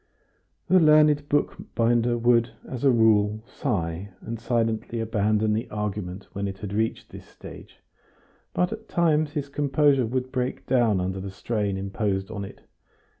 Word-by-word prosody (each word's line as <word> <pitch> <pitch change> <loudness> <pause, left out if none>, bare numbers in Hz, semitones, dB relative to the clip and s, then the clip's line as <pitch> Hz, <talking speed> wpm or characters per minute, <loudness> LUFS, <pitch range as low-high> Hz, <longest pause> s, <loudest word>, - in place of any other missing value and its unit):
The 185 - +5
learned 150 -2 +5
bookbinder 120 -4 +1
would, 120 0 +2
as 130 -1 -6
a 140 - +5
rule, 110 -3 +3
sigh 100 - -3
and 115 0 -6
silently 115 -1 -1
abandon 110 -1 +1
the 110 +3 -2
argument 105 -2 -4
when 100 0 -2
it 95 0 -6
had 100 +1 -6
reached 110 +2 -2
this - - -10
stage, - - -13 0.7
but 180 0 0
at 220 0 -10
times 155 -3 +2
his 145 -3 -3
composure 140 -2 +2
would 130 +2 -2
break 130 -1 -3
down 115 -7 +2
under 95 +1 -2
the 100 +1 -5
strain 100 0 -2
imposed 95 0 -2
on 105 -2 -5
it. 100 - -10
115 Hz, 150 wpm, -25 LUFS, 105-135 Hz, 0.7 s, The